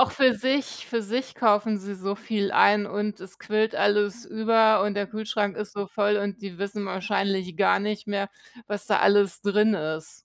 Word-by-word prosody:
auch 260 Hz, -, +4 dB
für 260 Hz, -3 st, +4 dB
sich 260 Hz, +5 st, -1 dB
für 230 Hz, -2 st, -2 dB
sich 250 Hz, +5 st, -3 dB
kaufen 215 Hz, -2 st, +2 dB
sie 200 Hz, +1 st, -7 dB
so 195 Hz, +1 st, -4 dB
viel 200 Hz, -1 st, -2 dB
ein, 205 Hz, 0 st, +4 dB
und 210 Hz, 0 st, -4 dB
es 190 Hz, 0 st, -12 dB
quillt 215 Hz, +1 st, 0 dB
alles 205 Hz, +2 st, +1 dB
über, 220 Hz, -2 st, +3 dB
und 205 Hz, 0 st, -1 dB
der 205 Hz, -1 st, -2 dB
Kühlschrank 215 Hz, -2 st, -3 dB
ist 210 Hz, -1 st, -5 dB
so 200 Hz, -1 st, -4 dB
voll, 205 Hz, +1 st, +1 dB
und 200 Hz, +1 st, -4 dB
die 190 Hz, -3 st, -8 dB
wissen 200 Hz, +1 st, -4 dB
wahrscheinlich 190 Hz, -2 st, -2 dB
gar 195 Hz, -, +3 dB
nicht 210 Hz, +1 st, -4 dB
mehr, 200 Hz, -1 st, -2 dB, 0.4 s
was 205 Hz, 0 st, -1 dB
da 205 Hz, -, +3 dB
alles 200 Hz, -3 st, +3 dB
drin 210 Hz, +1 st, +3 dB
ist. 155 Hz, -1 st, -4 dB
205 Hz, 195 wpm, -25 LUFS, 200-215 Hz, 0.4 s, auch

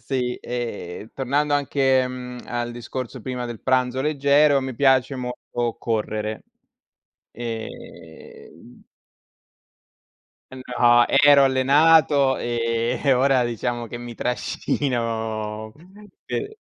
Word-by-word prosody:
Sì, 125 Hz, -2 st, -2 dB
ehm 115 Hz, -4 st, -6 dB
tornando 145 Hz, +3 st, 0 dB
anche, 135 Hz, -2 st, +2 dB
mhmm, 125 Hz, -1 st, -7 dB
al 120 Hz, 0 st, -3 dB
discorso 125 Hz, +1 st, -6 dB
prima 125 Hz, +1 st, -4 dB
del 120 Hz, -2 st, -7 dB
pranzo 130 Hz, 0 st, +1 dB
leggero, 145 Hz, 0 st, +3 dB
mi 130 Hz, -1 st, -5 dB
piace 135 Hz, +1 st, +2 dB
molto 120 Hz, -2 st, -4 dB
correre 110 Hz, -1 st, -3 dB, 0.9 s
ehm 110 Hz, -, -10 dB, 1.7 s
Ehm 130 Hz, -, -9 dB, 0.2 s
no, 120 Hz, 0 st, +6 dB
ero 140 Hz, 0 st, +6 dB
allenato, 140 Hz, +1 st, +4 dB
ehm, 115 Hz, 0 st, -1 dB
e 135 Hz, -, +6 dB
ora 130 Hz, -1 st, +3 dB
diciamo 120 Hz, 0 st, -3 dB
che 120 Hz, -, -7 dB
mi 120 Hz, 0 st, -8 dB
trascino 110 Hz, -4 st, -3 dB, 0.5 s
sì. 415 Hz, -, -3 dB
125 Hz, 100 wpm, -23 LUFS, 115-135 Hz, 1.7 s, no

